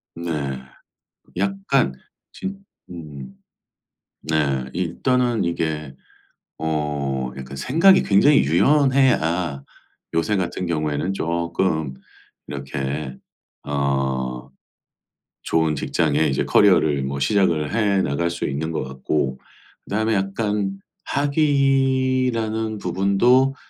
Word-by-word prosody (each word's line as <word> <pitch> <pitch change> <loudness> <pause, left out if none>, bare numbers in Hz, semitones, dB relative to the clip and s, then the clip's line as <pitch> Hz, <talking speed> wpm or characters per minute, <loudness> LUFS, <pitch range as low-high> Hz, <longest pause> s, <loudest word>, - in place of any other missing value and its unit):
네. 85 0 -4 1.1
약간 95 -9 +1 0.4
진 195 +1 -6 0.3
음. 75 -7 -9 0.9
네. 70 -5 0
일단은 120 +7 0
이게 80 -4 -2 0.6
어 75 -5 -2
약간 65 +1 -8
생각이 165 - +4
굉장히 140 +9 +5
유연해야 90 - +2 0.5
요새 80 +6 +1
같은 90 -1 -2
경우에는 75 +2 -1
쪼끔 85 -4 -1 0.5
이렇게 70 0 -4 0.5
어 65 -2 -2 0.9
좋은 80 -1 +1
직장에 75 +1 0
이제 65 - 0
커리어를 80 -8 +4
뭐 70 +1 -3
시작을 85 -1 +1
해 100 -4 +2
나갈 85 +5 -1
수 85 - -4
있는 75 +4 -3
것 80 - -2
같고 65 0 -2 0.4
그다음에 110 +2 0
약간 100 0 -1 0.3
학위라는 130 -6 +1
부분도 100 +9 +3
85 Hz, 190 characters per minute, -22 LUFS, 70-110 Hz, 1.1 s, 굉장히